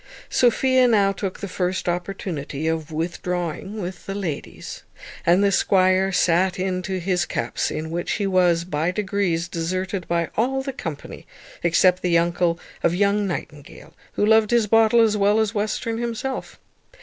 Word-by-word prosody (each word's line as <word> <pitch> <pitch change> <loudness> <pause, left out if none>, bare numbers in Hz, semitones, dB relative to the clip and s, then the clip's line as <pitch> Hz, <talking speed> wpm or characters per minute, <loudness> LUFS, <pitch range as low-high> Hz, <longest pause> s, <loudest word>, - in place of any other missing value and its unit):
Sophia 255 +1 +3
now 205 -4 +3
took 195 -1 -5
the 200 - -3
first 185 0 -2
opportunity 175 -4 -3
of 160 -1 -2
withdrawing 175 +4 -3
with 180 -1 -6
the 195 - -4
ladies, 175 -8 -5 0.5
and 180 +4 +5
the 200 - +3
squire 185 0 +3
sat 185 +1 +2
in 185 0 -1
to 190 0 -3
his 180 0 0
cups, 115 - -2
in 160 +1 -4
which 170 +1 -2
he 205 - -1
was, 180 -3 +3
by 160 -1 -1
degrees, 190 -3 -1
deserted 185 +2 -3
by 170 -1 0
all 265 +4 0
the 270 0 -4
company 165 - -7 0.3
except 180 +2 +3
the 175 -2 +3
uncle 170 0 +1 0.2
of 170 - +2
young 200 +1 +2
Nightingale, 150 -5 -7 0.2
who 205 - +1
loved 220 0 +4
his 235 -2 +3
bottle 225 +2 +4
as 220 -2 +3
well 205 +2 +3
as 220 -1 0
Western 220 +2 -2
himself. 240 +3 -4
185 Hz, 160 wpm, -23 LUFS, 170-205 Hz, 0.5 s, and